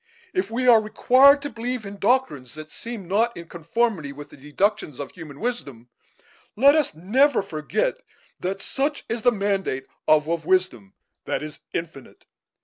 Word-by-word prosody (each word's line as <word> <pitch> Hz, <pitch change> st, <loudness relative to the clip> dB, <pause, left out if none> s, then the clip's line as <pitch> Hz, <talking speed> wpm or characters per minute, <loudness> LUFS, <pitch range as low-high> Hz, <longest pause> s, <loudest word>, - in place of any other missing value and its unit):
If 370 Hz, -1 st, -1 dB
we 250 Hz, +3 st, -1 dB
are 230 Hz, -3 st, +7 dB
required 260 Hz, +6 st, +5 dB
to 285 Hz, -, -4 dB
believe 240 Hz, 0 st, -4 dB
in 200 Hz, 0 st, -8 dB
doctrines 200 Hz, -, 0 dB
that 155 Hz, 0 st, -9 dB
seem 230 Hz, -6 st, -6 dB
not 225 Hz, +6 st, +1 dB
in 170 Hz, -1 st, -9 dB
conformity 170 Hz, -1 st, -1 dB
with 145 Hz, +1 st, -10 dB
the -, -, -14 dB
deductions 150 Hz, -, -1 dB
of 140 Hz, -, -6 dB
human 155 Hz, -5 st, -11 dB
wisdom, 140 Hz, -, -5 dB, 0.7 s
let 275 Hz, +6 st, +6 dB
us 300 Hz, -, +1 dB
never 240 Hz, -, +2 dB
forget 200 Hz, -, -2 dB, 0.4 s
that 190 Hz, +2 st, -3 dB
such 285 Hz, +2 st, -2 dB
is 230 Hz, 0 st, -3 dB
the 245 Hz, -, +4 dB
mandate 195 Hz, -, -1 dB, 0.2 s
of 155 Hz, -1 st, +5 dB
a 165 Hz, -, -1 dB
wisdom 165 Hz, -, 0 dB, 0.3 s
that -, -, -2 dB
is 155 Hz, -1 st, -7 dB
infinite. 165 Hz, -5 st, -7 dB
200 Hz, 160 wpm, -24 LUFS, 155-245 Hz, 0.7 s, are